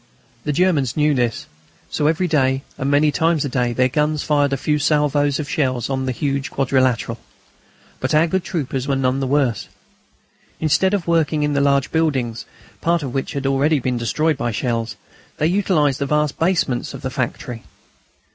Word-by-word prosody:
The 150 - 0
Germans 155 -6 +1
knew 150 0 +3
this. 120 -4 -1 0.5
So 150 - +1
every 165 +4 +1
day 135 -4 +1
and 135 - -2
many 145 +1 +3
times 160 -1 +1
a - - -2
day 125 -2 0
their 125 +2 +2
guns 150 +3 0
fired 145 -2 +2
a 135 - 0
few 150 +3 0
salvoes 145 -1 +2
of 150 - -3
shells 135 -5 -1
on 130 0 -1
the - - +1
huge 140 +1 -2
quadrilateral. 130 -3 0 0.8
But - - 0
our 155 +2 +5
good 185 +2 -1
troopers 140 -7 -3
were 140 - +1
none 130 0 +1
the 135 - -1
worse. 125 -7 +1 0.9
Instead 190 +6 +2
of 190 - -3
working 160 -3 +1
in 150 0 0
the 140 - +2
large 140 -1 +2
buildings, 135 -8 0 0.4
part 170 -1 +1
of 130 -3 -5
which 135 - -2
had 140 -1 -3
already 140 +3 +2
been 125 -2 -1
destroyed 155 +7 0
by 120 - -1
shells, 115 0 -2 0.4
they 150 - 0
utilised 165 -6 +2
the 140 - -1
vast 150 0 0
basements 165 -8 0
of - - -10
the 130 - -3
factory. 125 -2 -4
140 Hz, 185 wpm, -20 LUFS, 130-155 Hz, 0.9 s, our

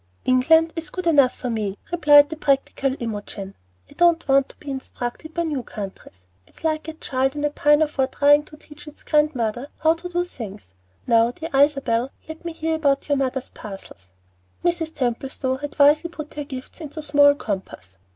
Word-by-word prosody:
"England 320 +6 +4
is 330 -2 -4
good 365 -1 -5
enough 285 -6 +4
for 250 - -4
me," 210 -3 -2
replied 295 -4 +6
the - - -3
practical 275 -2 0
Imogen. 205 -3 -6 0.3
"I - - -17
don't 340 -2 +3
want 275 0 +3
to - - -13
be 290 - -8
instructed 265 +3 -6
by 340 - 0
new 300 -5 -2
countries. 195 - -9 0.2
It's - - -19
like 315 0 -1
a 320 - -5
child 265 -2 -1
in 295 0 -1
a 295 - 0
pinafore 295 -2 +2
trying 290 +2 +4
to 300 - -14
teach 295 0 -15
its 300 - -13
grandmother 270 -5 0
how 320 0 +3
to 335 +2 -8
do 350 0 -1
things. 200 - -9 0.3
Now, 230 -1 +4
dear 320 +7 -7
Isabel, 270 -4 +2 0.2
let 315 +2 -9
me 340 - -4
hear 320 0 -2
about 280 -2 +1
your 285 - +3
mother's 265 -1 -2
parcels." 195 - -11 0.5
Mrs. 340 -2 0
Templestowe 260 0 -2
had 290 +2 -7
wisely 295 +4 +5
put 305 -3 -9
her 295 -1 -5
gifts 260 +4 -9
into 310 0 -7
small 285 -1 +5
compass. 190 - -6
285 Hz, 180 wpm, -23 LUFS, 250-315 Hz, 0.5 s, replied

